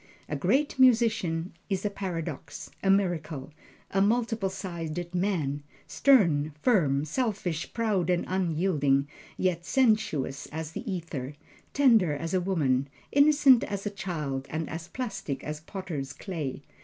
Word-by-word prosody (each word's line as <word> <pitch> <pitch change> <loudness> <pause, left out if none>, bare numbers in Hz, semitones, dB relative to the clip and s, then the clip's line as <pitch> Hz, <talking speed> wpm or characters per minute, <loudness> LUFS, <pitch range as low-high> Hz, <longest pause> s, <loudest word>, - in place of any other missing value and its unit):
A - - -3
Great 285 0 +1
Musician 225 -9 +3 0.2
is 195 0 -1
a 205 - 0
paradox, 165 -6 -5
a 195 - +1
miracle, 165 -7 0 0.4
a 195 - +2
multiple 225 -1 +1
sided 175 -3 -5
man 175 -7 0 0.2
stern, 165 - +3
firm, 150 - +2
selfish, 190 - -2
proud 210 -7 0
and 180 -1 +1
unyielding; 160 -6 +1 0.3
yet 180 -2 0
sensuous 215 - +1
as 160 0 -5
the 220 +6 -5
ether, 150 -6 -5 0.4
tender 230 - +4
as 165 +4 -4
a 185 - +2
woman, 140 -8 +1 0.2
innocent 285 -3 +6
as 200 0 -4
a 205 - -1
child, 150 -9 -4
and 160 +1 -3
as 165 +1 -6
plastic 195 - -4
as 150 0 -4
potters' 155 -6 -5
clay. 150 -8 -5
175 Hz, 130 wpm, -28 LUFS, 150-205 Hz, 0.4 s, innocent